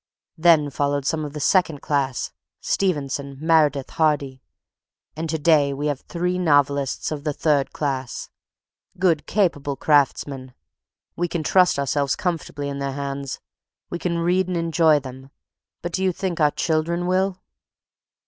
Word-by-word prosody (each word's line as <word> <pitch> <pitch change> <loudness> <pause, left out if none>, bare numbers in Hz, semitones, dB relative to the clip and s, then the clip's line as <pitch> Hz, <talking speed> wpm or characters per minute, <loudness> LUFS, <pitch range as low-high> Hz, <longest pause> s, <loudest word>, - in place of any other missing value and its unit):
Then 160 -4 +5
followed 140 0 -1
some 155 +1 0
of 145 -1 -6
the 150 - -5
second 165 -2 +2
class, 135 -4 -1 0.3
Stevenson, 140 -6 -1
Meredith, 150 -4 +2
Hardy. 145 -4 0 0.7
And 160 +1 -4
to 160 - 0
day 145 -3 +3
we 145 +2 -3
have 145 -3 -1
three 180 +3 -2
novelists 145 -5 +1
of 150 -2 -4
the 150 -2 -1
third 145 -2 +1
class, 135 -4 -3 0.7
good, 175 -4 +1
capable 145 -9 0
craftsmen. 135 -2 +1 0.6
We 175 - -1
can 170 -1 -3
trust 180 +1 +4
ourselves 140 0 0
comfortably 165 -6 -3
in 140 0 -4
their 140 -1 -2
hands. 140 -1 -5 0.5
We 175 - -3
read 175 +1 +1
and 180 -1 -2
enjoy 165 -2 +3
them, 130 0 -10 0.5
but 175 - -3
do 190 - -1
you 190 - +3
think 180 -1 -3
our 150 -1 +5
children 165 +3 -1
will?" 185 +1 0
150 Hz, 145 wpm, -23 LUFS, 140-170 Hz, 0.7 s, Then